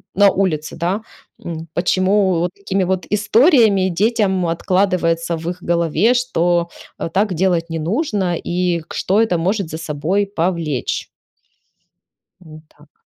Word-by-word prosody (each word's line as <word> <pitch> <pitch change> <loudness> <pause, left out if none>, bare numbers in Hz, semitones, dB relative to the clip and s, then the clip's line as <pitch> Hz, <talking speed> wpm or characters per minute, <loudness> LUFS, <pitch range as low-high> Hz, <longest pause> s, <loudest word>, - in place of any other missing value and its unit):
на 200 +1 +6
улице, 165 -6 -1
да. 180 +6 -1 0.4
М, 165 -1 -6
почему 185 +1 +2
вот 175 +1 -1
такими 195 -1 -1
вот 185 0 -1
историями 210 - +4
детям 190 -1 +1
откладывается 170 -1 0
в 165 +1 -4
их 180 0 -7
голове, 170 +6 +2
что, 175 -9 +1 0.3
э, - - -3
так 200 0 +1
делать 175 -1 0
не 165 0 -3
нужно 195 - -1
и 175 0 -1
к 160 - -12
что 200 +4 +2
это 220 -6 +1
может 190 +1 -1
за 160 - -5
собой 165 +5 -1
повлечь. 165 -8 -2 1.3
Во 155 -3 -13
так. 150 -1 -25
180 Hz, 135 wpm, -18 LUFS, 165-200 Hz, 1.3 s, на